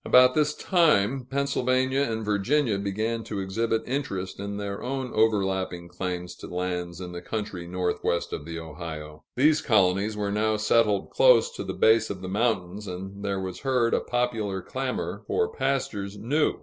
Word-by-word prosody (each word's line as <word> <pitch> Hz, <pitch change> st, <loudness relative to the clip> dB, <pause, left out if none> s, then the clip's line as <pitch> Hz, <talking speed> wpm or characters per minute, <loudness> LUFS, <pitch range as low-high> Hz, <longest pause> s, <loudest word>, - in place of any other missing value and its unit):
About 125 Hz, 0 st, +6 dB
this 150 Hz, 0 st, +2 dB
time, 135 Hz, -, +2 dB
Pennsylvania 130 Hz, -1 st, +1 dB
and 110 Hz, -5 st, -1 dB
Virginia 105 Hz, +2 st, +1 dB
began 110 Hz, +3 st, -2 dB
to 100 Hz, -, -4 dB
exhibit 110 Hz, +4 st, -1 dB
interest 120 Hz, -10 st, -3 dB
in 100 Hz, 0 st, -4 dB
their 100 Hz, -1 st, -4 dB
own 130 Hz, 0 st, -3 dB
overlapping 95 Hz, -5 st, +1 dB
claims 90 Hz, -1 st, -4 dB
to -, -, -9 dB
lands 90 Hz, -1 st, -3 dB
in 90 Hz, -1 st, -6 dB
the 90 Hz, 0 st, -6 dB
country 100 Hz, -3 st, -4 dB
northwest 90 Hz, -1 st, -1 dB
of -, -, -4 dB
the 85 Hz, +1 st, -6 dB
Ohio. 80 Hz, -2 st, -8 dB
Those 155 Hz, +4 st, +4 dB
colonies 100 Hz, 0 st, +2 dB
were 100 Hz, -1 st, -1 dB
now 110 Hz, +1 st, +1 dB
settled 105 Hz, -1 st, +2 dB
close -, -, +5 dB
to 480 Hz, -, -6 dB
the -, -, -5 dB
base 110 Hz, 0 st, +4 dB
of 95 Hz, -2 st, -5 dB
the 95 Hz, -, -4 dB
mountains, 105 Hz, -2 st, -1 dB
and 95 Hz, +2 st, -7 dB
there 100 Hz, -1 st, -1 dB
was 95 Hz, -1 st, -5 dB
heard 125 Hz, -4 st, +1 dB
a -, -, +4 dB
popular 115 Hz, -5 st, -1 dB
clamor 130 Hz, +3 st, -3 dB
for 445 Hz, 0 st, 0 dB
pastures 105 Hz, -, -2 dB
new. 145 Hz, +9 st, +1 dB
105 Hz, 165 wpm, -26 LUFS, 95-125 Hz, -, About